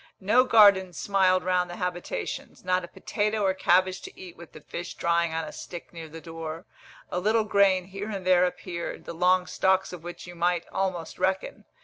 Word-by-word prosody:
No 225 Hz, +7 st, +4 dB
gardens 200 Hz, -7 st, +5 dB
smiled 185 Hz, -2 st, +2 dB
round 180 Hz, -1 st, +1 dB
the 175 Hz, -, -6 dB
habitations, 180 Hz, -, -5 dB
not 185 Hz, 0 st, +1 dB
a -, -, -6 dB
potato 210 Hz, +3 st, -2 dB
or 190 Hz, -, +3 dB
cabbage 185 Hz, 0 st, +2 dB
to -, -, -11 dB
eat 180 Hz, -2 st, -10 dB
with 170 Hz, -1 st, -13 dB
the 155 Hz, -, -12 dB
fish 175 Hz, +4 st, -7 dB
drying 170 Hz, 0 st, +1 dB
on 160 Hz, 0 st, -2 dB
a 155 Hz, -, -7 dB
stick 175 Hz, 0 st, -9 dB
near 165 Hz, -2 st, -8 dB
the 165 Hz, +2 st, -9 dB
door. 165 Hz, 0 st, -7 dB, 0.5 s
A 180 Hz, -, -1 dB
little 215 Hz, +4 st, +2 dB
grain 200 Hz, -3 st, +3 dB
here 195 Hz, +3 st, -6 dB
and 195 Hz, -3 st, -5 dB
there 180 Hz, -1 st, +5 dB
appeared, 175 Hz, -1 st, -5 dB
the -, -, -6 dB
long 180 Hz, +2 st, +3 dB
stalks 190 Hz, 0 st, +1 dB
of 175 Hz, -, -8 dB
which 175 Hz, 0 st, -8 dB
you 175 Hz, -, -10 dB
might 175 Hz, 0 st, 0 dB
almost 185 Hz, -4 st, -3 dB
reckon. 190 Hz, +1 st, -1 dB
180 Hz, 200 wpm, -27 LUFS, 175-190 Hz, 0.5 s, gardens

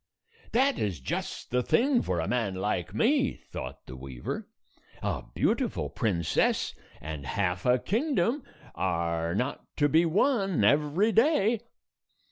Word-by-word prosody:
"That 265 Hz, +2 st, +3 dB
is 95 Hz, -8 st, -1 dB
just 65 Hz, -, -4 dB
the 125 Hz, 0 st, +2 dB
thing 250 Hz, -, +3 dB
for 90 Hz, -2 st, -1 dB
a 80 Hz, -, -1 dB
man 115 Hz, -6 st, 0 dB
like 95 Hz, -2 st, -2 dB
me," 265 Hz, -, +2 dB
thought 65 Hz, +2 st, -7 dB
the 65 Hz, -, -9 dB
weaver. 65 Hz, -2 st, -6 dB, 0.6 s
"A -, -, -1 dB
beautiful -, -, 0 dB
princess 85 Hz, -8 st, +1 dB, 0.3 s
and 75 Hz, -1 st, -6 dB
half 90 Hz, -, -1 dB
a 125 Hz, +1 st, +5 dB
kingdom 240 Hz, -, 0 dB, 0.3 s
are 85 Hz, -2 st, -1 dB
not 125 Hz, +6 st, -2 dB
to 145 Hz, -, +4 dB
be 160 Hz, +3 st, +4 dB
won 195 Hz, -, +2 dB
every 150 Hz, -, +3 dB
day." 230 Hz, -3 st, +3 dB
125 Hz, 130 wpm, -28 LUFS, -, 0.6 s, a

